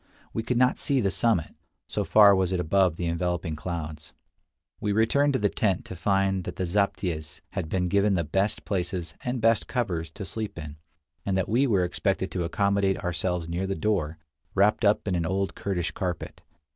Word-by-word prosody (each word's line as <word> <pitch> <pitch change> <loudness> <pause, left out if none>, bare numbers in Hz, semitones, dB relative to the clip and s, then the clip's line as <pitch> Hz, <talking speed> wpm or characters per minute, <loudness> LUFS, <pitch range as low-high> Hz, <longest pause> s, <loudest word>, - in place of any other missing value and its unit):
We 110 - -1
could 120 +2 -1
not 125 +1 +3
see 140 -2 +3
the 100 -5 +1
summit, 95 -7 +2 0.3
so - - -1
far 105 -2 +7
was 95 -1 +1
it 90 - 0
above 90 0 +2
the 85 - -3
enveloping 85 -1 -1
clouds. 80 -3 -6 0.7
We 105 - -1
returned 140 +7 +3
to - - +2
the 105 - +2
tent 95 -2 0
to 95 - -7
find 95 +1 +1
that - - -5
the 95 - -2
zaptiehs 85 -5 -1
had 80 - -4
been 90 0 0
given 100 +2 +2
the 85 - +1
best 95 +7 -1
places 90 -3 -2
and 125 0 -2
best 115 -1 +3
covers 90 -10 -2
to 100 - -6
sleep 105 -1 -5
in, 75 -1 -7 0.5
and 95 -1 0
that 95 - 0
we 125 +6 +2
were 100 -6 +3
expected 95 +2 -1
to 90 - -2
accommodate 100 +2 +1
ourselves 90 -1 -2
near 85 +3 -2
the 95 - -1
door, 85 -4 -1 0.4
wrapped 105 +4 +3
up 105 0 +3
in 95 - +1
an 85 -1 0
old 95 +2 -1
Kurdish 90 -4 -2
carpet. 90 -3 -4
95 Hz, 195 wpm, -26 LUFS, 85-105 Hz, 0.7 s, far